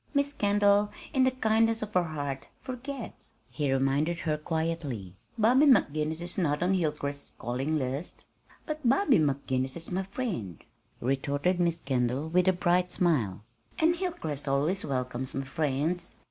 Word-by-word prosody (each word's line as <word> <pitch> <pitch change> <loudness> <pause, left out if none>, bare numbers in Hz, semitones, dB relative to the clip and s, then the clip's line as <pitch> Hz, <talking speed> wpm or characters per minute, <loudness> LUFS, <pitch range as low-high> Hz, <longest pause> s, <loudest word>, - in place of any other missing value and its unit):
"Miss 280 0 +2
Kendall, 205 -2 +3 0.2
in 260 -1 +4
the - - +5
kindness 225 -2 +2
of 210 0 -7
her 180 - +4
heart, 145 -4 -4
forgets," 260 -1 -7 0.2
he 145 -3 -1
reminded 140 +6 +1
her 155 -2 0
quietly. 150 - -3 0.2
"Bobby 250 +7 +5
McGinnis 155 - +3
is 175 +2 -4
not 150 -2 +1
on 185 +2 +2
Hilcrest's 150 -5 -2
calling 130 +6 -2
list." 140 +3 -3 0.4
"But 305 0 -3
Bobby 265 - +4
McGinnis 135 -2 0
is 165 +1 -5
my 185 +2 0
friend," 190 - -4 0.4
retorted 140 +7 0
Miss 170 -1 +1
Kendall 130 +3 0
with 180 +3 +3
a 190 - +6
bright 180 0 +2
smile, 120 - +1 0.3
"and 325 +2 +4
Hilcrest 160 - -4
always 145 +8 +1
welcomes 130 -2 -3
my 135 0 -2
friends." 155 +4 -1
165 Hz, 145 wpm, -29 LUFS, 140-205 Hz, 0.4 s, a